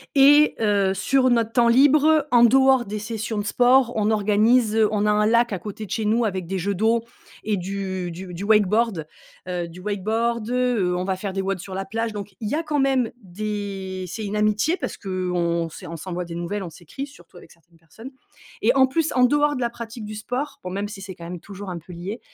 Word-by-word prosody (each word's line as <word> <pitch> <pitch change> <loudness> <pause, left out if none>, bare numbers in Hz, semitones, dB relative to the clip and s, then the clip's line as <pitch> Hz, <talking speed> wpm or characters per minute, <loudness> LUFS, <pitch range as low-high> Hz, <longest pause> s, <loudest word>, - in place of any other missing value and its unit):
et 290 +2 +6
heu, 200 -3 +2
sur 255 +7 +2
notre 230 -2 +2
temps 235 0 +3
libre, 290 +4 +5
en 240 -1 +6
dehors 265 +1 +5
des 210 +2 -5
sessions 220 0 -4
de 205 - -1
sport 245 +2 +4
on 215 -1 +1
organise, 215 +2 +3
on 210 -1 0
a 210 - +3
un 210 0 +2
lac 235 0 +3
à 190 - -3
côté 210 +3 -7
de 190 - -14
chez 220 +1 -1
nous, 225 +3 +2
avec 190 -4 -3
des 190 +2 -2
jeux 200 +3 -1
d'eau 225 +4 +1 0.4
et 215 -1 0
du 190 -1 -4
du 180 +2 -8
du 175 +3 -6
wakeboard. 210 -3 +2 0.4
Heu, 175 -1 -3
du 170 +2 -12
wakeboard, 220 +3 -1
heu, 245 -8 +1
on 180 - -2
va 190 0 -1
faire 190 +1 -5
des 195 - -1
WODs 195 -1 -2
sur 185 +2 -8
la 195 0 -3
plage 225 +3 -2
donc 205 -2 -8
il 215 -2 -3
y - - 0
a 325 - -1
quand 305 -2 -1
même 265 -3 +2
des 195 -1 -5
c'est 215 +5 -5
une 205 +1 -4
amitié 215 - +1
parce - - -5
qu'on 180 -3 -1
c'est - - -10
on 165 - -7
s'envoie 180 +2 -5
des 170 - -8
nouvelles, 175 +4 -4
on 175 - -6
s'écrit 175 - -8
surtout 270 -12 -17
avec - - -15
certaines 170 0 -24
personnes 170 +10 -12 0.5
et 235 +3 +4
en 265 -1 +5
plus, 320 +4 0
en 250 -1 +5
dehors 290 +3 +2
de 255 - -4
la 240 - +1
pratique 235 -1 -8
du 215 +1 -7
sport- 250 +7 -4
bon 180 - -5
même 200 +2 -3
si 205 -2 -9
c'est 190 0 -7
quand 170 -1 -11
même 175 +1 -6
toujours 200 +2 -9
un 180 - -4
peu 170 +2 -11
lié- 190 +7 -6
210 Hz, 235 wpm, -23 LUFS, 185-235 Hz, 0.5 s, et